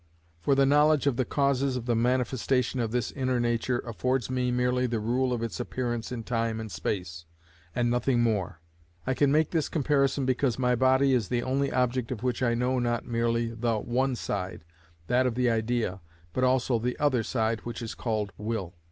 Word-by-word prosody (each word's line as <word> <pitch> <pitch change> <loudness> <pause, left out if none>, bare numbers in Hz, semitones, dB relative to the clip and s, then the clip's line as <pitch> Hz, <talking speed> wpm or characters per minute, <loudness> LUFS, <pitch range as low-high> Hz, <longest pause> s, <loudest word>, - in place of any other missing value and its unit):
For 135 +11 +2
the 135 0 +4
knowledge 150 +1 +4
of 140 -4 +2
the 130 0 0
causes 140 -1 +1
of 120 - -5
the 120 - +1
manifestation 125 +1 +1
of 115 -2 0
this 120 0 -1
inner 130 -2 -1
nature 120 +1 0
affords 125 +3 -1
me 125 -1 0
merely 125 +1 +1
the 115 -2 -1
rule 125 +4 0
of 120 -2 -1
its 110 -8 -4
appearance 120 -2 -3
in 120 -2 -4
time 115 -1 -1
and 110 -2 -6
space, 85 -5 -4 0.5
and 120 -1 +1
nothing 125 0 +1
more. 100 -7 -1 0.4
I 130 - +1
can 140 +2 +2
make 155 +1 +2
this 160 -4 0
comparison 140 -3 +1
because 130 -1 +1
my 125 -1 +2
body 130 +2 +3
is 120 -6 +1
the 120 -1 -1
only 135 +1 0
object 125 -1 0
of 120 -2 -4
which 125 0 -1
I 120 -2 +2
know 125 +2 +1
not 120 -1 -1
merely 115 -1 0
the 115 0 0
one 125 +4 0
side, 95 -7 -4 0.4
that 125 +6 +2
of 120 - -2
the 125 -1 +2
idea, 110 -4 -1 0.3
but 130 - 0
also 130 -2 +2
the 125 +2 -2
other 145 -5 +2
side 110 -1 -1
which 120 +2 -6
is 115 - -5
called 110 -4 -2
will. 105 -5 -3
125 Hz, 195 wpm, -28 LUFS, 115-130 Hz, 0.5 s, the